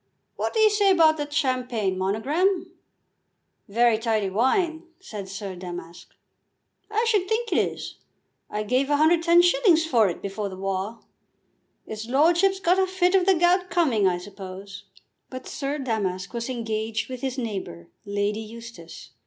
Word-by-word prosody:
What -, -, -3 dB
do -, -, +2 dB
you 435 Hz, -1 st, +6 dB
say 410 Hz, -1 st, +3 dB
about 325 Hz, -4 st, +5 dB
that 295 Hz, -1 st, -4 dB
champagne, 250 Hz, -9 st, 0 dB
Monogram?" 280 Hz, -, 0 dB, 1.0 s
"Very 230 Hz, +1 st, +3 dB
tidy 220 Hz, -4 st, 0 dB
wine," 320 Hz, -, +1 dB
said 210 Hz, -, -8 dB
Sir 195 Hz, -1 st, -6 dB
Damask. 175 Hz, -1 st, -9 dB, 0.7 s
"I 435 Hz, +2 st, 0 dB
should 415 Hz, -5 st, +1 dB
think 455 Hz, +1 st, -1 dB
it -, -, +3 dB
is. -, -, -3 dB, 0.5 s
I 210 Hz, 0 st, -3 dB
gave 255 Hz, +5 st, +1 dB
110s. 340 Hz, -, +4 dB
for 230 Hz, -10 st, +3 dB
it 170 Hz, -, -5 dB
before 200 Hz, +1 st, -4 dB
the 185 Hz, -, -9 dB
war. 195 Hz, +4 st, -3 dB, 0.8 s
'Is 220 Hz, +1 st, -7 dB
lordship's 345 Hz, +8 st, +3 dB
got 365 Hz, 0 st, +2 dB
a 380 Hz, -, +2 dB
fit 365 Hz, -1 st, +1 dB
of 380 Hz, -1 st, +3 dB
the 385 Hz, -, +5 dB
gout 355 Hz, +2 st, +2 dB
coming, 280 Hz, -, +2 dB
I 180 Hz, -1 st, +1 dB
suppose." 195 Hz, +1 st, -10 dB, 0.4 s
But 255 Hz, 0 st, -8 dB
Sir 280 Hz, +1 st, -3 dB
Damask 205 Hz, -7 st, -3 dB
was 235 Hz, +1 st, -4 dB
engaged 225 Hz, -2 st, -3 dB
with 255 Hz, -1 st, -7 dB
his 265 Hz, -1 st, -3 dB
neighbour, 190 Hz, -, -5 dB
Lady 205 Hz, +1 st, -1 dB
Eustace. 220 Hz, -, -11 dB
245 Hz, 150 wpm, -25 LUFS, -, 1.0 s, you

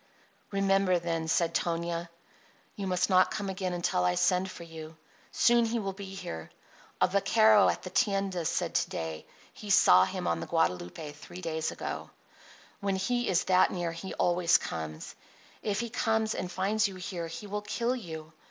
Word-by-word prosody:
"Remember, 195 Hz, -2 st, +2 dB
then," 165 Hz, -1 st, -2 dB
said 165 Hz, +1 st, +1 dB
Tonia, 170 Hz, 0 st, -1 dB, 0.7 s
"you 200 Hz, -1 st, -4 dB
must 180 Hz, 0 st, +1 dB
not 185 Hz, -1 st, +5 dB
come 205 Hz, -2 st, -3 dB
again 185 Hz, -1 st, -2 dB
until 175 Hz, -, 0 dB
I 90 Hz, 0 st, +2 dB
send 185 Hz, -, +2 dB
for 170 Hz, -, -9 dB
you. 160 Hz, -1 st, -10 dB, 0.3 s
Soon 240 Hz, 0 st, +4 dB
he 230 Hz, +1 st, 0 dB
will 195 Hz, -3 st, -2 dB
be 195 Hz, 0 st, -8 dB
here. 80 Hz, -, -6 dB, 0.5 s
A -, -, +5 dB
vaquero 205 Hz, +2 st, +5 dB
at -, -, -2 dB
the 185 Hz, -, -7 dB
tienda 195 Hz, -5 st, 0 dB
said -, -, -1 dB
to -, -, +1 dB
day 80 Hz, -1 st, -5 dB, 0.3 s
he 210 Hz, -, -10 dB
saw 205 Hz, +1 st, +7 dB
him 185 Hz, -1 st, -4 dB
on 85 Hz, -, 0 dB
the 85 Hz, -, -5 dB
Guadalupe 150 Hz, -, -1 dB
three 175 Hz, +5 st, -11 dB
days 160 Hz, -2 st, -2 dB
ago. -, -, -5 dB, 0.7 s
When 200 Hz, -2 st, -1 dB
he 240 Hz, +6 st, 0 dB
is 180 Hz, -1 st, +2 dB
that 185 Hz, -1 st, +4 dB
near 175 Hz, -2 st, -2 dB
he 170 Hz, +3 st, -7 dB
always 175 Hz, -1 st, +3 dB
comes. 80 Hz, -2 st, -6 dB, 0.5 s
If 205 Hz, 0 st, -1 dB
he 235 Hz, -1 st, -5 dB
comes 220 Hz, -2 st, +1 dB
and 180 Hz, -, -4 dB
finds 205 Hz, +4 st, +1 dB
you 195 Hz, -, -8 dB
here 180 Hz, -2 st, -5 dB
he 165 Hz, +5 st, -7 dB
will 205 Hz, +1 st, -3 dB
kill 235 Hz, +4 st, -1 dB
you. 160 Hz, -8 st, -8 dB
185 Hz, 180 wpm, -29 LUFS, 165-200 Hz, 0.7 s, saw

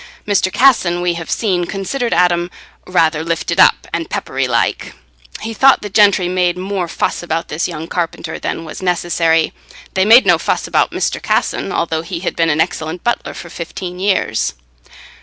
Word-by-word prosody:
Mr. 200 Hz, -2 st, +1 dB
Casson, 210 Hz, -10 st, +3 dB
we 175 Hz, 0 st, 0 dB
have 165 Hz, -2 st, -7 dB
seen, 185 Hz, -6 st, 0 dB
considered 230 Hz, +7 st, -3 dB
Adam 175 Hz, -1 st, +2 dB, 0.4 s
"rather 160 Hz, -3 st, +2 dB
lifted 165 Hz, -1 st, -2 dB
up -, -, +5 dB
and -, -, -3 dB
peppery -, -, -2 dB
like": -, -, -1 dB, 0.5 s
he 225 Hz, -, -4 dB
thought 270 Hz, +2 st, +4 dB
the 205 Hz, -, -6 dB
gentry 200 Hz, -3 st, +4 dB
made 180 Hz, -1 st, 0 dB
more 190 Hz, -1 st, -3 dB
fuss -, -, -2 dB
about 165 Hz, -1 st, -3 dB
this 155 Hz, +3 st, -1 dB
young 165 Hz, -2 st, -6 dB
carpenter 170 Hz, -2 st, -4 dB
than 165 Hz, -, -4 dB
was 160 Hz, -, -8 dB
necessary; 170 Hz, -2 st, +1 dB, 0.4 s
they 190 Hz, -, +2 dB
made 230 Hz, +5 st, +7 dB
no -, -, +4 dB
fuss -, -, -1 dB
about -, -, +1 dB
Mr. -, -, -2 dB
Casson, -, -, -1 dB
although 160 Hz, -1 st, -1 dB
he 170 Hz, 0 st, -6 dB
had 185 Hz, -, -3 dB
been 165 Hz, -1 st, +2 dB
an 155 Hz, 0 st, +1 dB
excellent 160 Hz, +2 st, -2 dB
butler 240 Hz, -, -2 dB
for 175 Hz, -, -9 dB
fifteen 180 Hz, +1 st, -6 dB
years. 190 Hz, -, 0 dB
175 Hz, 175 wpm, -16 LUFS, 165-195 Hz, 0.5 s, made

